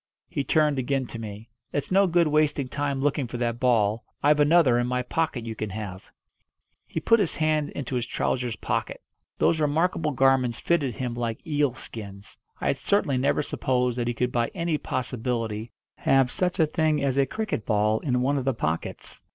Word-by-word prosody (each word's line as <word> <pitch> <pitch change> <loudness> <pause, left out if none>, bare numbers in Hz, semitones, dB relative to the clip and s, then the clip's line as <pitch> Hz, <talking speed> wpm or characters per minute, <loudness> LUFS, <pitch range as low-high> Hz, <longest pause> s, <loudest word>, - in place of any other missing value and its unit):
He 140 - -2
turned 150 0 +2
again 135 +1 0
to 115 - -5
me. 110 0 -8 0.2
"It's 145 - -3
no 195 +1 +5
good 170 -1 +3
wasting 150 -2 +2
time 140 0 -2
looking 145 -2 0
for 120 - -5
that 120 -1 -1
ball. 115 -3 +2 0.2
I've 150 +1 +4
another 145 -5 +5
in 120 - 0
my 125 0 -1
pocket 130 -3 -1
you 115 - -4
can 110 -1 -4
have." 100 -2 -7 0.8
He - - -3
put 230 0 +4
his 195 -6 0
hand 155 -1 +1
into 135 -1 -5
his 120 -2 -1
trousers' 125 -2 -1
pocket. - - -3 0.4
Those 160 - +2
remarkable 155 +2 +1
garments 130 -3 +2
fitted 145 -9 0
him 125 +1 -3
like 115 -2 -4
eel 145 -4 +1
skins. 100 -5 -8 0.2
I - - -5
had - - +1
certainly 145 -10 +1
never 140 +3 +1
supposed 125 -3 0
that 120 - -1
he 120 - -1
could 125 +1 0
by 120 -1 +1
any 170 -4 -1
possibility 115 -3 -2 0.3
have 135 -2 +3
such 180 -1 0
a 160 - +6
thing 155 -1 +1
as 135 -2 +1
a 135 - +3
cricket 220 - -3
ball 105 0 +2
in 125 -4 0
one 140 +2 +1
of 130 - -5
the 135 -3 +1
pockets. 80 -6 -4
130 Hz, 190 wpm, -26 LUFS, 120-150 Hz, 0.8 s, a